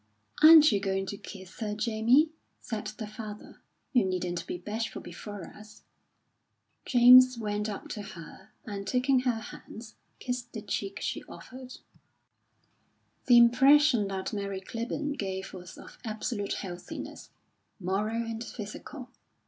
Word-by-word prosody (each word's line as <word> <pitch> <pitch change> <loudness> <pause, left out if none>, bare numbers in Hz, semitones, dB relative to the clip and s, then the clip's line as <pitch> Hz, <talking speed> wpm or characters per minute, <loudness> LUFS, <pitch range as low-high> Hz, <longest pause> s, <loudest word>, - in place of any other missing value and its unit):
"Aren't 310 -2 +9
you 205 - +2
going 195 -1 -1
to 200 - -5
kiss 190 -2 -11
her, 210 -2 -3
Jamie?" 230 +8 +3 0.3
said 220 -3 -5
the 215 +1 -6
father. 210 -1 -9 0.3
"You 245 -4 +5
needn't 180 -2 -2
be - - -4
bashful 215 +5 -4
before 195 +2 -8
us." 215 0 -15 1.0
James 255 0 +8
went 210 -1 -2
up 205 - -6
to 210 - -5
her, 190 0 -11 0.2
and 200 -2 -6
taking 255 +3 +2
her 250 -3 0
hands, 220 0 -11 0.2
kissed 245 -1 -5
the 220 -3 -6
cheek 200 -1 -3
she - - -3
offered. 255 0 -11 1.5
The 245 -2 +7
impression 255 0 +6
that 190 +2 -4
Mary 200 -2 -3
Clibborn 250 +8 -4
gave 190 -1 -4
was 180 -2 -10
of - - -13
absolute 215 -2 -3
healthiness, 180 -2 -7 0.5
moral 210 +5 -1
and 225 0 -5
physical. 240 +4 -8
215 Hz, 135 wpm, -29 LUFS, 195-245 Hz, 1.5 s, Aren't